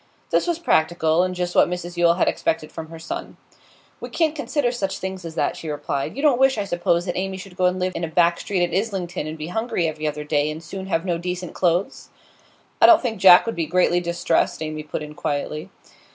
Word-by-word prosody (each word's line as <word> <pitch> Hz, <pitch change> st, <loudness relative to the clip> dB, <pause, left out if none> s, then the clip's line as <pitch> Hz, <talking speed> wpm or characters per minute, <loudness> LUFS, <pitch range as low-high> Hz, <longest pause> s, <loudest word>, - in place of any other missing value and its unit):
This -, -, +2 dB
was 345 Hz, -2 st, 0 dB
practical, 160 Hz, -, +2 dB
and 185 Hz, 0 st, -1 dB
just 180 Hz, 0 st, -2 dB
what -, -, +4 dB
Mrs 175 Hz, 0 st, -5 dB
Yule 170 Hz, -1 st, +4 dB
had 180 Hz, -, +1 dB
expected 160 Hz, -1 st, -1 dB
from 160 Hz, -1 st, -7 dB
her 165 Hz, -, -9 dB
son. 160 Hz, -, -6 dB, 0.6 s
'We -, -, -7 dB
can't 320 Hz, -2 st, 0 dB
consider 290 Hz, -4 st, 0 dB
such 195 Hz, -6 st, -3 dB
things 190 Hz, 0 st, -5 dB
as 165 Hz, -1 st, -7 dB
that,' -, -, 0 dB
she 160 Hz, -, -7 dB
replied. 145 Hz, -2 st, -3 dB
'You 280 Hz, -, -4 dB
don't 280 Hz, -5 st, +4 dB
wish, 265 Hz, -2 st, +4 dB
I 205 Hz, -, 0 dB
suppose, 175 Hz, -2 st, 0 dB
that 175 Hz, -, -3 dB
Amy 190 Hz, 0 st, -2 dB
should 190 Hz, -1 st, -11 dB
go 185 Hz, -, +1 dB
and 180 Hz, +1 st, -1 dB
live 185 Hz, 0 st, -1 dB
in -, -, -3 dB
a -, -, 0 dB
back 170 Hz, +1 st, +2 dB
street 195 Hz, -4 st, -1 dB
at -, -, -10 dB
Islington, 185 Hz, -6 st, -2 dB
and 155 Hz, +1 st, -6 dB
be 155 Hz, +1 st, -6 dB
hungry 220 Hz, -4 st, -1 dB
every 155 Hz, 0 st, -3 dB
other 150 Hz, 0 st, -3 dB
day, 150 Hz, 0 st, +1 dB
and 155 Hz, +2 st, -6 dB
soon 190 Hz, +2 st, -7 dB
have 165 Hz, -2 st, -1 dB
no 175 Hz, -3 st, -1 dB
decent 180 Hz, 0 st, -4 dB
clothes?' 180 Hz, +7 st, 0 dB, 0.7 s
'I -, -, +9 dB
don't 340 Hz, -2 st, +7 dB
think 225 Hz, -5 st, -2 dB
Jack 180 Hz, -1 st, +8 dB
would 230 Hz, -, -2 dB
be 165 Hz, -2 st, -2 dB
greatly 175 Hz, +1 st, +3 dB
distressed,' 170 Hz, -2 st, 0 dB
Amy 155 Hz, 0 st, -4 dB
put 150 Hz, 0 st, -5 dB
in 150 Hz, 0 st, -9 dB
quietly. 150 Hz, +4 st, -3 dB
175 Hz, 235 wpm, -22 LUFS, 160-190 Hz, 0.7 s, I